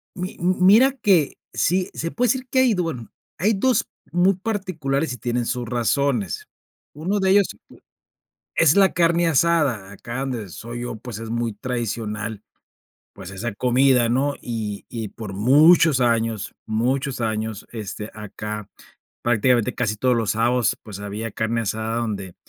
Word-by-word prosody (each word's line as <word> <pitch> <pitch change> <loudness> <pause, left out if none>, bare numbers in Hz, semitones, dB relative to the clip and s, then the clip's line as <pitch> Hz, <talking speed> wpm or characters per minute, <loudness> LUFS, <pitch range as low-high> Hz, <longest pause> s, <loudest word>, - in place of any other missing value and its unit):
Mi 180 +1 -5
m 180 +2 +2
mira 225 +8 +7
que 195 - +2 0.2
sí 180 +2 +1
se 165 - -3
puede 245 +1 +1
decir 260 -1 0
que 260 - +2
hay 255 -3 +4
do 180 -3 0
bueno, 125 -9 -5 0.3
hay 210 +6 +2
2 230 +2 +1 0.2
muy 175 +3 +4
particulares 170 - -2
y - - -7
tienen 120 +1 -1
sus 120 0 -2
razones. 120 -2 0 0.5
Uno 180 +8 -1
de 190 -1 +2
ellos 200 -1 +5 1.1
es 165 0 +4
la 195 -1 +5
carne 170 0 +3
asada, 145 - +2
acá 120 +5 -6
donde 125 -7 -3
soy 115 +7 -7
yo, 120 -2 -4
pues, 115 -1 -8
es 115 0 -7
muy 115 -1 -1
tradicional, 110 -2 -4 0.7
pues 95 -2 -10
esa 100 +4 -4
comida, 125 +1 +3
¿no?, 135 +4 +1
y 110 -4 -4
y 115 -3 -5
por 105 -1 -8
muchos 145 - +5
años, 115 -3 0
muchos 130 +4 -1
años, 110 -2 -2
este, 105 -1 -6
acá 105 0 -6 0.5
prácticamente 120 +1 +2
casi 110 -3 -1
todos 125 +3 +2
los 115 -3 +1
sábados, 120 +1 +1
pues 105 -3 -9
había 105 +3 -5
carne 110 +2 -1
asada, 110 +1 -2
donde 100 -6 -4
120 Hz, 155 wpm, -22 LUFS, 110-165 Hz, 1.1 s, mira